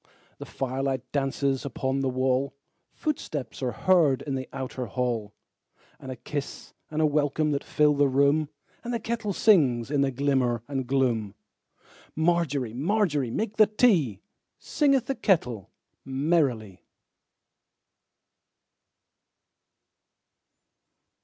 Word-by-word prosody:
The -, -, -8 dB
firelight 130 Hz, -1 st, -3 dB
dances 135 Hz, -1 st, 0 dB
upon 135 Hz, -1 st, -2 dB
the 135 Hz, -1 st, 0 dB
wall, 130 Hz, +1 st, 0 dB, 0.4 s
Footsteps 145 Hz, -, -4 dB
are 125 Hz, -2 st, -1 dB
heard 155 Hz, -1 st, +3 dB
in 140 Hz, -, -4 dB
the 130 Hz, -1 st, -4 dB
outer 130 Hz, -2 st, -5 dB
hall, 115 Hz, -2 st, -2 dB, 0.6 s
And 130 Hz, -, -8 dB
a -, -, -5 dB
kiss 140 Hz, +3 st, -6 dB, 0.2 s
and 155 Hz, +1 st, 0 dB
a -, -, +5 dB
welcome 150 Hz, +1 st, +1 dB
that 140 Hz, -, -1 dB
fill 150 Hz, -1 st, +3 dB
the 145 Hz, 0 st, +3 dB
room, 140 Hz, +3 st, +2 dB, 0.3 s
And 240 Hz, 0 st, -3 dB
the -, -, -1 dB
kettle 225 Hz, -1 st, -3 dB
sings 140 Hz, -, +3 dB
in 145 Hz, -2 st, +2 dB
the 140 Hz, -, +2 dB
glimmer 130 Hz, -3 st, 0 dB
and 135 Hz, -3 st, -3 dB
gloom. 120 Hz, -6 st, 0 dB, 0.8 s
Margery, 160 Hz, -7 st, 0 dB
Margery, 150 Hz, -, 0 dB
make 215 Hz, -, -3 dB
the 215 Hz, -1 st, +7 dB
tea, 175 Hz, -, +2 dB, 0.4 s
Singeth 275 Hz, -4 st, +1 dB
the 270 Hz, -, -1 dB
kettle 125 Hz, -, 0 dB, 0.3 s
merrily. 130 Hz, -, 0 dB
140 Hz, 115 wpm, -26 LUFS, 130-160 Hz, 0.8 s, the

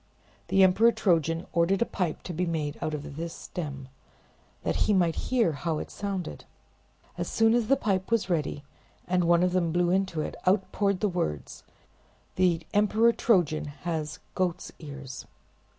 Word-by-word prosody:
The 195 Hz, -, +4 dB
Emperor 205 Hz, +5 st, +5 dB
Trojan 165 Hz, -6 st, +1 dB
ordered 185 Hz, +6 st, +3 dB
a -, -, -5 dB
pipe 180 Hz, -9 st, -3 dB
to 180 Hz, -, -5 dB
be 180 Hz, +2 st, -1 dB
made 155 Hz, -3 st, -2 dB
out 155 Hz, -, -1 dB
of 145 Hz, -1 st, -8 dB
this 165 Hz, +1 st, -4 dB
stem, 140 Hz, -6 st, -6 dB, 0.8 s
that -, -, 0 dB
he 210 Hz, -, +4 dB
might 175 Hz, -4 st, +3 dB, 0.2 s
hear 235 Hz, -9 st, +3 dB
how 160 Hz, +2 st, -2 dB
it -, -, -6 dB
sounded. 200 Hz, -3 st, -4 dB, 0.7 s
As -, -, -2 dB
soon 225 Hz, 0 st, +3 dB
as 235 Hz, -2 st, +2 dB
the 275 Hz, -, +5 dB
pipe 195 Hz, -7 st, -1 dB
was 230 Hz, -4 st, +1 dB
ready, 150 Hz, -5 st, -1 dB, 0.4 s
and 180 Hz, -1 st, +2 dB
one 170 Hz, +1 st, +4 dB
of 180 Hz, -, +2 dB
them 175 Hz, -2 st, +1 dB
blew 175 Hz, +1 st, +2 dB
into 190 Hz, -4 st, 0 dB
it, -, -, -4 dB
out 190 Hz, +1 st, +2 dB
poured 200 Hz, -2 st, 0 dB
the 210 Hz, -, +3 dB
words: 75 Hz, -, -3 dB, 0.7 s
"The 175 Hz, -3 st, +2 dB
Emperor 215 Hz, +3 st, +4 dB
Trojan 165 Hz, -, +2 dB
has 150 Hz, +2 st, -4 dB, 0.2 s
goat's 180 Hz, -1 st, -2 dB
ears!" 140 Hz, -4 st, -8 dB
175 Hz, 165 wpm, -28 LUFS, 160-195 Hz, 0.8 s, Emperor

